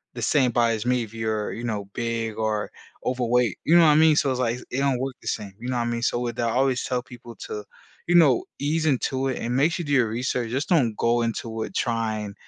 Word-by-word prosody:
the - - -5
same 130 -4 +3
body 115 -1 +2
as 110 +1 -5
me 125 -1 +2
if 110 0 -10
you're, 110 -2 -2
you 120 - -7
know, 105 -4 -3
big 115 -2 -3
or 110 -1 -1 0.3
overweight, 125 -4 +1
you 165 - +4
know 170 - +7
what - - +6
I - - +4
mean? 160 -1 +5
So 140 -3 +2
it's 130 - -2
like, 120 -1 0
it 130 - -1
don't 135 -3 +1
work 130 -1 -3
the - - -11
same, 100 -3 -3
you 125 +2 -5
know 125 - -1
what 120 - 0
I - - -3
mean? 120 0 -2
So 120 - +1
with 120 -1 -3
that, 115 - 0
I - - -2
always 130 0 +1
tell 125 -1 -2
people 120 -2 -12
to, 105 0 -5 0.4
you 175 - +2
know, 145 -8 +5 0.2
ease 155 +3 0
into 135 -1 0
it 130 - -2
and 120 +2 -2
make 150 +5 +3
sure 175 - -3
you - - -9
do - - -2
your 125 -4 +4
research. 120 0 -2
Just 135 +3 -1
don't 125 - +3
go 120 0 +2
into 115 -1 -3
it - - -8
trying, 110 -4 -1
120 Hz, 270 wpm, -24 LUFS, 115-135 Hz, 0.4 s, know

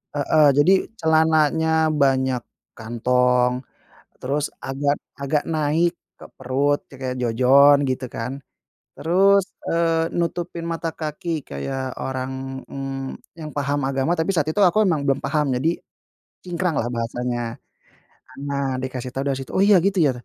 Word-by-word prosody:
Heeh. 150 +2 +3
Jadi, 145 +6 +5 0.3
celananya 160 0 +3 0.3
banyak 130 -2 +2 0.4
kantong, 125 +2 +2 0.7
terus 140 +3 -1 0.2
agak 140 +2 -1 0.2
agak 140 +1 0
naik 160 +2 +1 0.3
ke - - -11
perut 135 +3 +1
ya - - -11
kayak 130 -1 -3
Jojon 130 +5 +6
gitu 130 0 -2
kan. 115 +3 -4 0.6
Terus, 195 +4 +4 0.2
eee, 165 -1 +1
nutupin 170 0 -3
mata 165 0 -2
kaki 155 +2 -5 0.2
kayak 130 - -4
orang, 130 0 -3 0.4
mmm, 135 -1 -5 0.2
yang 155 -2 -6
paham 145 0 0
agama, 135 +3 0
tapi 160 +4 +1
saat 155 -2 +1
itu 205 - -3
aku 195 +4 +4
memang 155 -5 +1
belum 135 0 +2
paham, 145 0 0
jadi 130 +6 +1 0.8
cingkranglah 175 -7 -1
bahasanya. 120 0 -3 0.7
Karena 140 +2 -6 0.3
dikasih 130 -1 -5
tahu 135 - -1
dari 140 - +1
situ, 135 - -8
"Oh, - - +2
iya, 205 0 +6
gitu 195 0 +1
ya?" 140 - +3
140 Hz, 135 wpm, -22 LUFS, 130-160 Hz, 0.8 s, Jojon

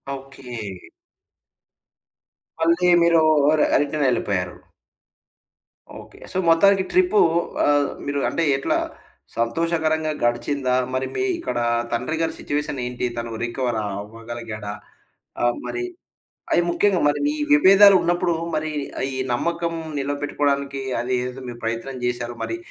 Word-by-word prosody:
Okay. 135 -3 -9 2.0
మళ్ళీ 170 +2 +3 0.2
మీరు 170 -1 +5 0.3
ఆహ్, - - +4
రి - - +5 0.2
రిటనెళ్ళిపోయారు. 125 - -1 1.4
ఓకే. - - -14
సో, - - -3
మొత్తానికి 195 +3 +5
ట్రిప్పు 185 +3 +3 0.5
ఆహ్, 145 -1 +3 0.2
మీరు 145 0 -1
అంటే 170 - -1
ఎట్లా 135 - 0 0.6
సంతోషకరంగా 160 +5 0
గడిచిందా? 125 +2 0 0.2
మరి 130 0 0
మీ 390 - 0
ఇక్కడ 335 - -4 0.3
తండ్రి 125 +7 -1
గారి 165 - 0
సిట్యుయేషనేంటి? 130 -4 -3
తను 115 0 -4
రికవర్ 120 -1 -1
అవ్వగలిగాడా? 110 +1 -6 0.7
ఆహ్, 120 0 +2
మరి 360 - -3 0.7
అది 175 - +4
ముఖ్యంగా 185 +1 +2
మరి 145 - +1
మీ 295 - +1 0.2
విభేదాలు 200 -8 +8
ఉన్నప్పుడు. 175 0 +1 0.2
మరి 155 0 -1 0.4
ఈ 130 - -5 0.2
నమ్మకం 170 +6 -1 0.2
నిలవబెట్టుకోవడానికి 140 0 -1 0.2
అది 125 +2 -3
ఏదైతే 125 +1 -5
మీ 120 - -6
ప్రయత్నం 115 +4 -3
చేశారో 120 -1 -3
మరి, 345 - -3
140 Hz, 115 wpm, -22 LUFS, 120-170 Hz, 2.0 s, విభేదాలు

